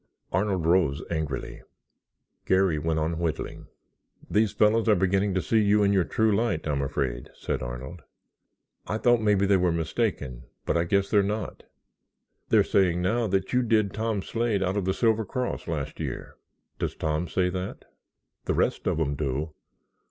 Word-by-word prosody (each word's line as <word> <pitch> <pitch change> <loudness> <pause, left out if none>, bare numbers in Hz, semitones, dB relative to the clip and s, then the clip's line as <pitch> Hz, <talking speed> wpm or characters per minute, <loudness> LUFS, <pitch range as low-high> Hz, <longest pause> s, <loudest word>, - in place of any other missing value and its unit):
Arnold 95 -2 0
rose 80 -4 +2
angrily. 80 -5 -3 0.9
Garry 95 -4 +3
went 80 +1 -1
on 80 +1 -1
whittling. 85 -2 -3 0.6
"These 105 -1 +3
fellows 110 +2 +3
are 105 - +6
beginning 95 +1 +1
to 95 - 0
see 110 - +2
you 105 0 +4
in 100 0 +3
your 95 -3 +3
true 110 -2 +2
light, 100 -8 0
I'm 70 -2 0
afraid," 65 -3 -2
said - - -3
Arnold. 65 +7 -6 0.9
"I 110 - -1
thought 120 0 +3
maybe 105 -2 +3
they 100 0 +4
were 90 -1 +2
mistaken 80 - -2 0.2
but - - 0
I 85 0 +2
guess 100 +3 +1
they're 105 - +5
not. 105 +1 -4 0.8
They're - - +5
saying 90 -2 +2
now 115 +5 +1
that 95 +1 -1
you 125 - +4
did 110 -4 +2
Tom 110 -3 -1
Slade 115 -4 0
out 95 +1 -1
of 100 -3 -1
the 95 - +1
Silver 110 -2 +2
Cross 125 +4 -3
last 75 -5 -4
year." - - -5 0.4
"Does - - -2
Tom 80 +2 -1
say 90 +2 0
that?" 90 +1 -5 0.6
"The - - 0
rest - - 0
of - - +1
them 75 -3 0
do. 75 +2 -3
95 Hz, 170 wpm, -26 LUFS, 80-105 Hz, 0.9 s, are